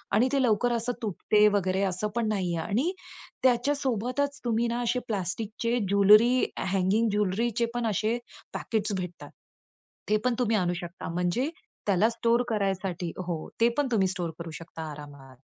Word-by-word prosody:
आणि 245 +5 +4
ते 275 - +3
लवकर 240 +1 +2
असं 235 +1 -1
तुटत 210 0 -2 0.2
वगैरे 190 -1 +1
असं 185 +4 -2
पण 235 -2 +1
नाहीये. 185 -5 -1
आणि 235 - 0 0.5
त्याच्यासोबतच 260 +1 +1
तुम्ही 235 0 +1
ना 235 +1 -1
असे 245 +2 +1
प्लास्टिकचे 220 +4 -2
ज्वेलरी 210 +5 +6 0.3
हॅंगिंग, 200 +4 +2
ज्वेलरीचेपण 230 +4 0
असे 220 +3 0 0.4
पॅकेट्स 215 -2 -2
भेटतात 180 -1 -7 0.8
ते 215 - +4
पण 250 -2 +2
तुम्ही 225 -3 +2
आणू 175 -2 +1
शकता 175 +1 -7
म्हणजे 180 - 0 0.4
त्याला 200 +3 +4
स्टोअर 235 +1 +1
करायसाठी 190 -5 -1 0.2
हो. 165 -3 -3
ते 235 - +6
पण 290 -2 +2
तुम्ही 195 -5 +3
स्टोअर 175 -3 -3
करू 170 -1 -6
शकता 160 -2 -7
आरामात. 140 -3 -11
215 Hz, 145 wpm, -27 LUFS, 185-235 Hz, 0.8 s, ज्वेलरी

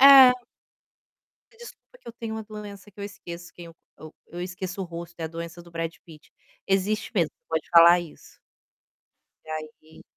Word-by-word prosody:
É. 270 -2 +11 1.2
"Me 450 - -24
desculpa 475 +1 -13
que - - -17
eu 235 - -7
tenho 225 -2 -5
uma 220 - -4
doença 210 -1 -9
que 205 - -18
eu - - -4
esqueço 175 -4 -8
quem 175 - -10
eu 165 -1 -13 0.2
eu 155 0 -11
eu 175 - -7
esqueço 185 +1 -4
o - - -1
rosto, 170 0 -8
é 165 - -2
a - - -2
doença 170 +1 -7
do 170 - -16
Brad 165 0 -3
Pitt." 155 -3 -15 0.4
Existe 200 +4 +1
mesmo, 170 -7 +2 0.2
pode 160 -1 -1
falar 170 +1 +8
isso. 170 -3 -12 1.1
E - - -14
aí, 155 0 -8
175 Hz, 185 wpm, -26 LUFS, 165-210 Hz, 1.2 s, É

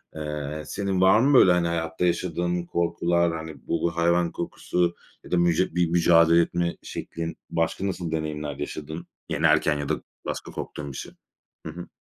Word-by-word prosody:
Eee, 75 0 -4
senin 95 -2 -1
var 95 +3 +6
mı, 140 +3 +4
böyle, 90 - +7
hani, 90 -1 +2
hayatta 85 +1 -1
yaşadığın 85 0 0
korkular, 85 0 +1
hani, 80 -3 -9
bu 85 0 0
hayvan 85 0 +2
korkusu 85 -1 -1 0.3
ya - - -13
da 90 - +3
mücü 85 0 +2
bir 85 -2 +2
mücadele 85 -1 +5
etme 85 0 -1
şeklin? 85 0 -5
Başka 85 +4 -1
nasıl 90 -3 -3
deneyimler 75 -2 -3
yaşadın? 80 +4 -6 0.2
Yenerken 75 -2 +3
ya 70 -1 -4
da - - -1 0.2
başka - - -5
korktuğun 70 -1 -6
bir 65 - -8
şey? - - -7 0.5
Hı 80 - -4
hı. 85 +2 -8
85 Hz, 165 wpm, -25 LUFS, 80-90 Hz, 0.5 s, böyle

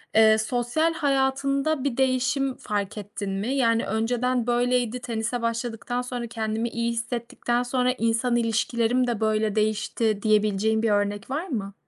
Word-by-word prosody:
eee, 220 0 +6
sosyal 245 +8 0
hayatında 275 0 +1
bir 275 -4 -1
değişim 265 +1 +1
fark 205 0 -3
ettin 205 -1 -5
mi? 200 +7 -2
Yani, 230 -4 +2
önceden 240 +3 0
böyleydi, 245 0 +1
tenise 235 0 -2
başladıktan 230 +1 -2
sonra, 245 -1 -4
kendimi 225 0 -2
iyi 235 0 -1
hissettikten 235 +1 -2
sonra 250 0 +1
insan 230 +2 +1
ilişkilerim 235 +1 +1
de 235 -3 -1
böyle 215 -1 +1
değişti 215 0 0
diyebileceğin 215 0 +2
bir 225 - +2
örnek 205 +1 0
var 305 +7 -2
mı? 200 - -4
235 Hz, 140 wpm, -25 LUFS, 220-250 Hz, -, eee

